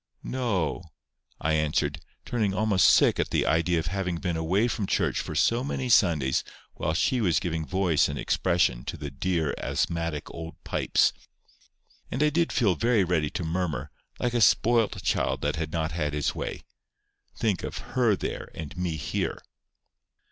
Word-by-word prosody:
"No," 105 -11 -1 0.6
I 80 +1 0
answered, 75 -1 0 0.2
turning 105 -5 0
almost 100 -3 +4
sick - - +4
at - - 0
the - - +1
idea 85 +2 +2
of 80 - -1
having 90 0 -2
been 85 0 -2
away 90 +8 +1
from 105 -4 -2
church - - +1
for - - -5
so 120 +2 +2
many 130 -2 -3
Sundays 80 - +3 0.3
while 80 +1 -2
she 125 +8 +1
was 90 -6 +3
giving 80 -4 -3
voice 95 -5 +2
and - - -4
expression 85 -9 +1
to - - -5
the 70 -1 -6
dear 80 +2 -1
asthmatic 85 -3 -2
old 80 0 -7
pipes. - - +2 1.0
And 130 +5 0
I 150 - +3
did 170 +1 +1
feel 105 -7 +3
very 115 0 +2
ready 85 -4 +1
to 90 - -4
murmur, 80 -4 -2 0.3
like 120 -1 0
a 120 - +1
spoilt 115 +2 +3
child - - 0
that 75 +2 -1
had 80 -1 -3
not 80 -1 -1
had 75 -2 -2
his 75 -1 0
way. - - -5 0.7
Think 105 -5 0
of - - -5 0.2
HER 120 -5 +3
there, - - -5
and 80 -2 -7
me 90 -3 -2
here! 70 - -2
90 Hz, 170 wpm, -27 LUFS, 80-105 Hz, 1.0 s, almost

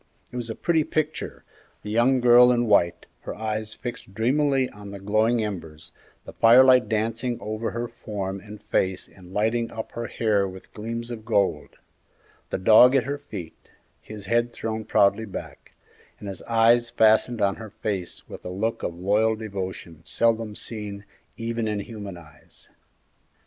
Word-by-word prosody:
It - - -11
was 120 -2 -4
a 110 - -4
pretty 165 -2 +1
picture; 155 +1 -3 0.4
the 105 - -5
young 125 +3 +3
girl 125 0 +7
in 120 -1 +2
white, 85 -5 +2
her - - -7
eyes 110 0 -3
fixed 120 -5 -8
dreamily 135 +3 +2
on 105 -1 -11
the 100 0 -8
glowing 110 +4 +2
embers, 80 -7 -7 0.3
the - - -10
firelight 125 +2 +6
dancing 115 +2 -1
over 110 +1 -3
her 120 +1 -3
form 100 -4 -5
and 105 +1 -11
face 95 0 -1
and 90 -1 -16
lighting 115 +3 0
up 110 0 -7
her 120 0 -5
hair 105 -3 +1
with 95 0 -12
gleams 115 +2 -5
of 110 -2 -7
gold; 100 -9 0 0.7
the - - -2
dog 110 +7 +7
at 135 - +4
her 140 +1 -4
feet, 95 - -10 0.3
his 105 -2 -10
head 120 +3 +1
thrown 110 -1 -4
proudly 100 +2 +3
back, 100 - -9 0.4
and 105 - -9
his 95 -2 -6
eyes 115 +1 +4
fastened 110 +1 +3
on 100 -1 +1
her 110 -1 -8
face 100 -3 -5
with - - -10
a - - -6
look 105 +5 -2
of 85 - -3
loyal 105 +5 +2
devotion 95 -6 -6
seldom 115 +2 0
seen 105 -3 -6 0.3
even 115 0 -2
in 105 -1 -1
human 100 -3 -7
eyes. 75 -3 -17
110 Hz, 165 wpm, -25 LUFS, 100-120 Hz, 0.7 s, girl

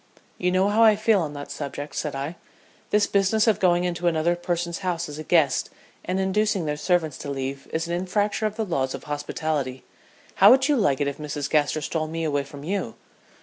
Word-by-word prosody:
"You 180 0 +1
know 185 +2 +3
how 215 +2 +2
I 220 -2 +7
feel 215 -1 +3
on 150 -3 -3
that 145 0 -7
subject," 145 0 -6
said 150 -3 -3
I. 140 +5 -4 0.5
"This 210 0 +3
business 200 +2 +2
of 220 -3 +3
going 175 -1 +3
into 175 0 -1
another 170 +1 +2
person's 175 -1 -2
house 175 -3 -2
as 150 0 -8
a - - -5
guest 155 -5 +2 0.3
and 185 +1 -2
inducing 190 -1 +1
their 150 -1 -1
servants 160 -3 0
to 140 - -6
leave 135 0 -4
is 165 +1 -2
an 170 - -3
infraction 205 +4 0
of 210 - -6
the 220 0 -2
laws 135 -8 -1
of - - -9
hospitality. 145 -2 -3 0.5
How - - +8
would 265 0 +6
you 295 - +3
like 150 - +2
it 145 - +1
if 140 - -4
Mrs. 145 -1 -3
Gaster 155 0 +2
stole 155 +1 -2
me 165 +1 -4
away 145 -3 0
from 140 0 -11
you?" 180 - -3
165 Hz, 215 wpm, -24 LUFS, 145-190 Hz, 0.5 s, How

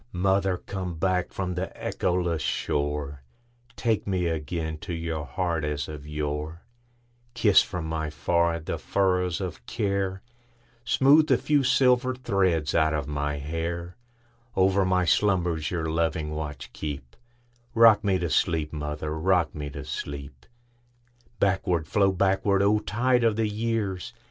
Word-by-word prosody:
Mother, 95 0 +1
come 90 -2 -5
back 90 +1 0
from 90 -2 -3
the 90 +1 -2
echoless 90 -3 -1
shore, 75 -1 -2 0.5
Take 110 -4 0
me 95 -3 0
again 80 -1 -3
to 85 +1 -5
your 80 -2 -3
heart 85 -4 -1
as 75 -2 -2
of 75 -1 -8
yore; 75 +2 -4 0.7
Kiss 105 -4 +6
from 90 -4 -4
my 80 -1 -2
forehead 85 +1 0
the - - -3
furrows 90 -2 +1
of 95 -3 -5
care, 100 -3 -1 0.6
Smooth 140 +5 +5
the - - +4
few 145 -2 +2
silver 130 -1 +3
threads 95 - +1
out 80 -1 +3
of 75 -2 -3
my 75 0 -2
hair; 85 +4 -4 0.6
Over 95 +1 +3
my 90 -1 +2
slumbers 85 -3 +1
your 85 -3 -2
loving 80 -1 -1
watch 75 -2 -6
keep;—Rock 115 - 0
me 100 -2 +2
to 85 -2 -2
sleep, 80 -2 +1
mother,—rock 80 +4 0
me 75 -1 -5
to - - -8
sleep! 70 -3 -7 0.9
Backward, 90 -4 +1
flow 100 +3 +3
backward, 95 +1 +2
O 105 +1 +4
tide 125 +4 +1
of 115 -2 +3
the 110 0 +1
years! 105 -3 -2
90 Hz, 135 wpm, -26 LUFS, 80-100 Hz, 0.9 s, Kiss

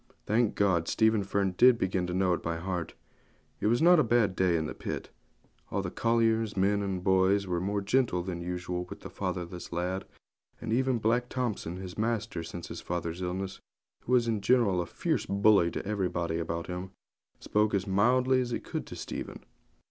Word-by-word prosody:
Thank 110 +1 +2
God, 90 -5 +2
Stephen 110 -2 +3
Fern 95 -1 0
did 125 -1 +7
begin 95 -3 -1
to 90 - -3
know 95 -1 +2
it - - -2
by 85 0 -2
heart! 90 0 -4 0.6
It - - 0
was 120 +7 +2
not 175 0 +7
a - - +5
bad 115 -5 +2
day 90 -2 +2
in 80 - -1
the 80 - -4
pit. - - -6 0.6
All 100 0 -1
the 90 - -4
colliers, 115 -2 +1
men 100 +2 +2
and 95 -2 -3
boys, 95 +1 +3
were 90 -2 -1
more 100 +2 -1
gentle 100 -4 +1
than 90 -2 -4
usual 90 0 -3
with - - -10
the - - -9
fatherless 90 -2 -4
lad; 90 +2 -2 0.5
and 110 -1 -3
even 130 0 +2
Black 120 +3 +1
Thompson, 110 -9 -3
his 95 +1 -8
master 110 -6 -1
since 85 +1 -7
his - - -7
father's 85 0 -4
illness, 95 +2 -3 0.5
who 125 - -1
was 120 -2 +4
in 110 -3 0
general 100 -4 +3
a 85 - -5
fierce 155 - -1
bully 100 -3 +4
to - - -5
everybody 90 -5 -1
about 85 0 -3
him, 90 +1 -5 0.5
spoke 105 0 +1
as 95 -1 0
mildly 125 +6 +3
as 125 - -3
he 120 - -2
could - - -5
to - - -8
Stephen. - - -6
95 Hz, 195 wpm, -29 LUFS, 90-115 Hz, 0.6 s, did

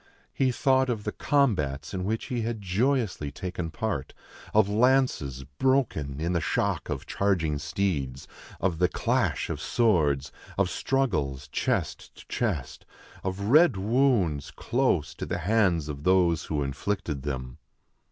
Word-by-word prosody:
He 130 -1 +2
thought 130 +1 +2
of 110 -4 -2
the 105 - -2
combats 90 - 0
in 95 -1 -2
which 110 +3 -1
he 120 -2 -2
had 115 0 -2
joyously 105 - 0
taken 90 +1 -5
part: 110 - -3 0.4
of 110 -2 +4
lances 105 - +2 0.2
broken 110 - +1
in 85 +3 -1
the 85 - +1
shock 75 - -1
of - - -3
charging 85 -7 0
steeds; 70 -7 -2 0.3
of 85 -3 0
the 90 - +3
clash - - 0
of - - -4
swords; 80 - +2 0.3
of - - +2
struggles, 75 - -1
chest - - -2
to - - -15
chest; 90 - -2 0.4
of 95 +1 -3
red 155 - +6
wounds, 105 - +2
close 120 - 0
to - - -6
the - - -2
hands 90 -5 +2
of 70 -2 -5
those 90 -3 +3
who 75 -2 -1
inflicted 70 +1 -3
them. 65 -3 -5
95 Hz, 140 wpm, -27 LUFS, 75-115 Hz, 0.4 s, red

